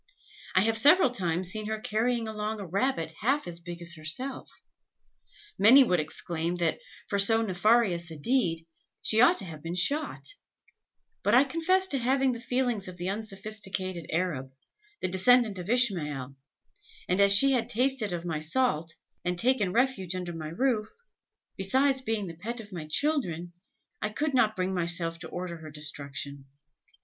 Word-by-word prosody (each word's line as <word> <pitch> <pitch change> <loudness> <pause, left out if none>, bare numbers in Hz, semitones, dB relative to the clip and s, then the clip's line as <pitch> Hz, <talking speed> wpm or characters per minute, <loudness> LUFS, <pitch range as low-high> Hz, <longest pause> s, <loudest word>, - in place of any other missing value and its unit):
I 185 - +6
have 225 +2 +1
several 295 +1 +6
times 180 -5 -1
seen 215 0 -3
her 220 0 -3
carrying 225 +2 0
along 215 0 -4
a 200 - -6
rabbit 185 -3 -1
half 275 +6 +1
as 170 -1 -5
big 175 0 -8
as 170 0 +1
herself. 175 - -4 1.0
Many 245 +8 +8
would 180 -8 +1
exclaim, 165 +2 -3
that, 170 -2 -1 0.3
for 200 - -1
so 225 +3 +5
nefarious 190 -3 +2
a 160 - -8
deed, 165 - 0 0.4
she 220 +1 +3
ought 250 - +6
to 195 - +1
have 155 -4 -9
been 165 +2 -5
shot; 285 - +1 0.9
but 205 +3 +2
I 255 - +7
confess 335 +6 +1
to 275 - +1
having 265 +2 +2
the 235 - -5
feelings 245 -5 -1
of 180 -1 -9
the 180 +1 -3
unsophisticated 195 -4 -3
Arab, 155 -6 -2 0.5
the - - 0
descendant 205 +2 +3
of 180 +2 -7
Ishmael, 150 - +1 0.7
and 185 +2 +1
as 200 0 +5
she 270 +8 +6
had 250 -4 0
tasted 250 -3 +1
of 175 -1 -4
my 160 -3 -2
salt, 165 -2 0 0.3
and 180 0 -2
taken 230 -3 +2
refuge 220 -6 0
under 180 -1 -5
my 160 -2 -6
roof, 215 +4 0 0.7
besides 265 +8 +1
being 225 -4 -2
the 170 - -7
pet 225 +9 -6
of 210 -3 -10
my 160 -4 -6
children, 175 - 0 0.5
I 210 - -1
could 285 +7 -2
not 220 -4 +3
bring 185 +1 -2
myself 170 -1 -1
to 160 - -8
order 175 -1 -5
her 160 -1 -10
destruction. 140 -2 -4
195 Hz, 165 wpm, -28 LUFS, 170-245 Hz, 1.0 s, Many